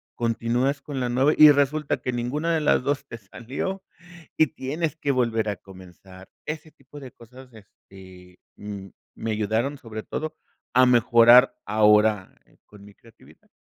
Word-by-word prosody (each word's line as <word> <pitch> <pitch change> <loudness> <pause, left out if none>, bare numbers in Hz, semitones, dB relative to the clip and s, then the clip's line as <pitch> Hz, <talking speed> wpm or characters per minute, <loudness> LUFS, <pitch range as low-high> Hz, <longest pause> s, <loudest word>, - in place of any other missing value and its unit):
continúas 120 +4 -1
con 140 -2 -6
la 125 -1 -2
nueva, 130 +5 +2
y 155 -1 +9
resulta 145 +1 0
que 125 - -3
ninguna 145 +8 -2
de 160 - -1
las 150 - +2
2 140 +1 -2
te 120 - -9
salió, 130 - -6 0.5
y 155 - +4
tienes 155 +3 -4
que 145 -3 -2
volver 115 -4 0
a 100 - -4
comenzar. 95 0 -15 0.2
Ese 155 0 -6
tipo 140 +1 -15
de 130 -2 -10
cosas, 125 +2 -16
este, 95 -3 -17 0.2
mm, 100 -2 -8 0.3
me 115 - -4
ayudaron 110 +6 -2
sobre 110 -4 -9
todo 155 0 -6 0.4
a 130 +1 +5
mejorar 120 +1 +5
ahora, 105 -1 +2 0.3
con 105 -1 -17
mi 105 -1 -17
creatividad. 115 -1 -22
120 Hz, 155 wpm, -24 LUFS, 105-140 Hz, 0.5 s, y